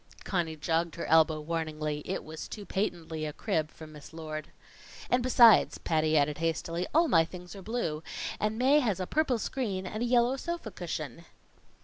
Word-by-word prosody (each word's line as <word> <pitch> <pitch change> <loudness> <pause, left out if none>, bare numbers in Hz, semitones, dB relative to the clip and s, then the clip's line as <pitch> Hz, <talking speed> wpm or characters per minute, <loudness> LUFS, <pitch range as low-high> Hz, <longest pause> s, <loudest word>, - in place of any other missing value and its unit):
Conny 170 -4 -1
jogged 165 +2 -1
her 170 - -4
elbow 160 0 +4
warningly. 155 -1 -3
It - - -2
was 155 0 -7
too 205 - -8
patently 170 -6 -2
a 150 - -2
crib 160 -3 -1
from 160 -1 -12
Miss 150 +1 -12
Lord. 155 -1 -6 0.6
"And 250 - +4
besides," 240 -4 +6
Patty 155 -1 +1
added 145 +1 +1
hastily, 165 +2 -1
"all 330 +2 +4
my 165 - +5
things 180 +2 -9
are 195 - -9
blue, 190 -8 -2 0.4
and 215 +1 0
Mae 270 +5 +5
has 215 -9 0
a 185 - -1
purple 285 - +1
screen 210 -6 -3
and 215 +4 -5
a - - +1
yellow 245 +2 +3
sofa 340 -7 -4
cushion." 165 -4 -5
170 Hz, 175 wpm, -30 LUFS, 155-220 Hz, 0.6 s, besides